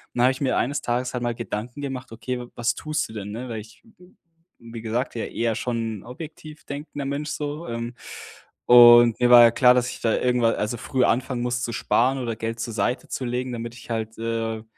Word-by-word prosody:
dann 120 - +2
habe 130 - +5
ich 130 - -11
mir 130 -3 +1
eines 140 +4 0
Tages 125 +1 -2
halt 125 -1 -3
mal 120 0 0
Gedanken 120 +2 -5
gemacht: 135 -3 -5
„Okay, 125 +2 -5
was 120 +2 0
tust 155 -1 -2
du - - -12
denn?”, 105 -2 -6
ne? 120 +4 -6
Weil 115 -3 -5
ich 110 +1 -17
bin, 180 -5 -21 0.4
wie 115 -1 -9
gesagt, 115 +3 -2
ja 115 - -2
eher 115 -1 -1
schon 115 -3 -3
'n - - -15
objektiv 155 +3 -10
denkender 145 0 -6
Mensch 140 +2 -3
so, 150 +3 -4
ähm, 115 +1 -5 0.7
und 120 -1 +8
mir 125 0 +3
war 120 -1 +10
ja 115 - +7
klar, 125 +1 +5
dass 125 0 +1
ich - - -9
da 115 - +1
irgendwa 125 -2 +2
also, 110 +2 -2
früh 130 +3 -1
anfangen 125 0 0
muss, 125 0 -1
zu 115 - -3
sparen 130 +4 +1
oder 120 -3 -3
Geld 115 +1 -4
zur 115 0 -4
Seite 110 +4 -1
zu 130 - -4
legen, 125 +1 -2
damit 115 0 -6
ich 120 - -14
halt, 110 -1 -3
äh, 115 -1 -3
120 Hz, 225 wpm, -24 LUFS, 115-130 Hz, 0.7 s, war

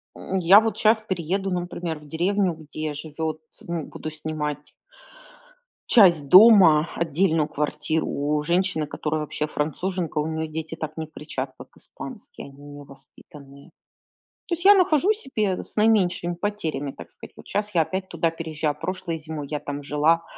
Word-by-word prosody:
М, 190 - -4
я 185 +4 +8
вот 225 0 -2
щас 220 +1 +4
перееду, 190 -1 -2
например, 175 -2 -3
в 150 - -16
деревню, 185 +3 0
где 155 -1 -6
живет 155 +1 -5 0.2
ну, 170 -3 -4
буду 155 - -7
снимать 150 -1 -5 1.2
часть 170 - +5
дома, 185 -7 +8
отдельную 165 -1 +1
квартиру 150 +2 -2
у 150 +1 -1
женщины, 175 -2 0
которая 155 +1 -3
вообще 150 0 -3
француженка, 160 +2 -2
у 150 - -1
нее 160 0 -3
дети 160 +1 -6
так 155 -1 -6
не 160 -1 -4
кричат, 135 -4 -6
как - - -11
испанские, - - -10
они 140 +1 -16
у - - -12
нее 145 0 -10
воспитанные. 140 +1 -16 0.8
То 345 - 0
есть 345 +3 -3
я 410 - +10
нахожу 365 0 +3
себе 215 - -2
с - - -13
наименьшими 200 -5 +2
потерями, 160 -8 -3
так 85 -6 -12
сказать: - - -14
вот - - -14
щас 210 0 -2
я 165 - +5
опять 185 +3 -3
туда 165 -1 0
переезжаю, 155 -2 -3
прошлой 170 -1 -4
зимой 155 -2 -6
я 150 -1 -2
там 145 0 -6
жила. 150 +4 +2
160 Hz, 160 wpm, -24 LUFS, 150-185 Hz, 1.2 s, я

